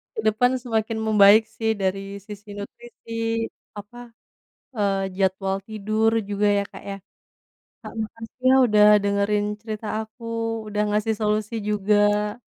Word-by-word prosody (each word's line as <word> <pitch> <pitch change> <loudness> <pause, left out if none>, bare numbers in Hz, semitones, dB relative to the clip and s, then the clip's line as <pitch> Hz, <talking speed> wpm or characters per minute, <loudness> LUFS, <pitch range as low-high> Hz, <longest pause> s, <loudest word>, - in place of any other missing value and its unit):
ke - - -4
depan 230 +4 +3
semakin 225 -2 -1
membaik 210 0 +7
sih 225 -1 +1
dari 190 0 0 0.2
sisi 205 0 -11
nutrisi, 230 +3 -11 0.7
apa, 205 +4 -10 0.8
eee, 195 -2 0
jadwal 190 0 0
tidur 215 +1 0 0.2
juga 205 +1 +1
ya - - +1
Kak - - -11
ya. 195 - -4 0.9
Kak, - - -8
makasih 225 +1 -11
ya 260 - +6
udah 210 -2 +5 0.2
dengerin 200 +1 +1 0.2
cerita 220 0 -6
aku, 220 +2 -10 0.4
udah 210 0 -1
ngasih 215 +1 +1
solusi 215 +1 0
juga. 210 0 +2
210 Hz, 130 wpm, -23 LUFS, 200-220 Hz, 0.9 s, membaik